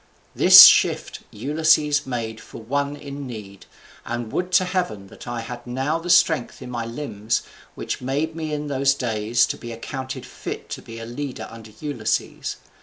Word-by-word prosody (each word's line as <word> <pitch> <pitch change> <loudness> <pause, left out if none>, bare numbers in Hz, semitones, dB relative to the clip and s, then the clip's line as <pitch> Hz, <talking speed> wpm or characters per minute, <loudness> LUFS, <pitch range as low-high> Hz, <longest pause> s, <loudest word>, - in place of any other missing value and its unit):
This - - +11
shift - - +3
Ulysses 150 +3 +2
made 115 -3 -4
for - - -11
one 140 +5 -2
in 140 -1 -8
need, 105 -5 -10 0.4
and 120 -1 -5
would 180 0 -2
to 185 0 +5
heaven 180 - -2
that - - -13
I 120 -1 -3
had 120 +1 -8
now 135 +6 -1
that 175 +1 -7
strength 160 -6 +3
in 125 -1 -9
my 115 -2 -4
limbs 115 -3 -3 0.3
which - - -4
made 145 +5 -2
me 160 -2 -4
in 150 0 -3
those 135 -1 +1
days 115 -2 +1
to - - -4
be 120 - -8
accounted 130 +2 -6
fit - - -7
to - - -6
be 115 - -10
a 115 - -7
leader 120 -2 -6
under 115 -1 -11
Ulysses! 145 -8 -2
130 Hz, 175 wpm, -23 LUFS, 115-145 Hz, 0.4 s, This